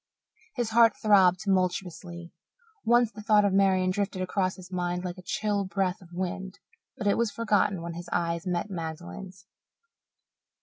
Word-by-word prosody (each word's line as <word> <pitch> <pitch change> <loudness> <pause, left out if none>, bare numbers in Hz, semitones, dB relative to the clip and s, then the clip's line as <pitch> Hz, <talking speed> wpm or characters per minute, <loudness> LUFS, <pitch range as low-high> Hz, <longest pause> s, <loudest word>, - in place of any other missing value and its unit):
His 240 -4 -2
heart 230 -1 +5
throbbed 190 -4 +5
tumultuously. 180 -3 -2 0.5
Once 240 -1 +3
the 215 - -10
thought 210 -1 +4
of 200 - +1
Marian 190 -1 +3
drifted 195 -1 -2
across 185 0 -1
his 185 -1 -13
mind 180 0 -2
like 180 +1 -5
a - - -12
chill 205 +1 -1
breath 190 0 -1
of 175 - -15
wind, 190 +1 -4 0.4
but 215 - -5
it 200 - +2
was 235 -2 +2
forgotten 205 -5 0
when 170 0 -5
his 175 +1 -8
eyes 170 0 -1
met 180 +3 -2
Magdalen's. 180 +3 -7
185 Hz, 160 wpm, -27 LUFS, 180-205 Hz, 0.5 s, heart